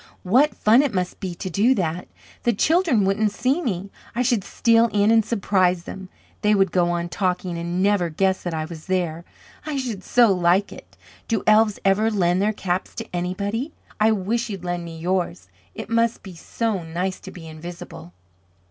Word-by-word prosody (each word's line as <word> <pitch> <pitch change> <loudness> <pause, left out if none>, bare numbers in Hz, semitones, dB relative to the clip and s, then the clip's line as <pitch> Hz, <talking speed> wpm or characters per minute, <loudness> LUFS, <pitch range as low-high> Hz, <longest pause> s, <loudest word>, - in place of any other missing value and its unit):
What 255 +11 +3
fun 225 +5 +5
it 280 -8 -1
must 180 -1 -2
be 185 -3 -5
to 185 +2 -5
do 225 +9 +3
that. 175 -2 -2 0.3
The 240 - +2
children 310 - +2
wouldn't 205 +2 +1
see 255 - 0
me. 195 - -3 0.2
I 245 - +1
should 235 -5 +1
steal 230 +3 +3
in 205 +1 +3
and 225 -1 +5
surprise 185 -5 +1
them; 190 +1 -8 0.3
they 210 0 +3
would 195 -3 +2
go 175 0 +2
on 175 0 -1
talking, 180 -1 -2
and 170 +2 -2
never 200 -4 +2
guess 190 +4 0
that 175 - -4
I 155 0 -2
was 160 0 -10
there. 175 -3 -1 0.4
I 300 -2 -3
should 235 -8 -4
so 240 0 +4
like 180 +2 +2
it. - - -15 0.3
Do 225 - -1
elves 215 -1 +4
ever 200 +3 +3
lend 185 -3 +1
their 210 +2 +2
caps 185 -3 -3
to 225 -5 -7
anybody? 200 - -2 0.3
I 215 +1 +4
wish 225 +4 -1
you'd 195 -4 -6
lend 175 -1 -3
me 165 -1 -8
yours. 165 - -2 0.3
It - - -6
must 230 +1 +1
be 190 -3 -9
so 210 +4 -3
nice 175 +3 -3
to - - -10
be 170 -2 -11
invisible." 160 - -9
195 Hz, 190 wpm, -23 LUFS, 175-225 Hz, 0.4 s, fun